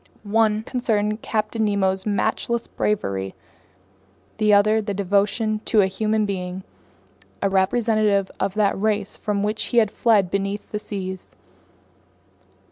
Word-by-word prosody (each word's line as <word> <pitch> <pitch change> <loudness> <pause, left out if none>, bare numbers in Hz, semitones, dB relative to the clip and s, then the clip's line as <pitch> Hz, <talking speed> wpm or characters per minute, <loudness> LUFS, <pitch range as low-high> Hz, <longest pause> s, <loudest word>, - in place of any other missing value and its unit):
One 215 0 +2
concerned 215 -3 -1
Captain 220 0 -1
Nemo's 190 -2 +1
matchless 230 +3 0
bravery, 100 - -2 1.0
the 215 -1 +3
other 205 +1 +5
his - - +1
devotion 205 +2 0
to 220 -3 +4
a - - +4
human 215 +3 0
being, 185 -1 -4 0.8
a 195 - 0
representative 205 0 +2
of 200 - -1
that 210 -2 +2
race 210 -2 0
from 205 -2 -2
which 210 +1 -1
he 240 - -2
had 215 -3 +4
fled 205 -6 +2
beneath 200 +1 -3
the 210 - -2
seas. 190 -3 -6
210 Hz, 125 wpm, -22 LUFS, 195-215 Hz, 1.0 s, other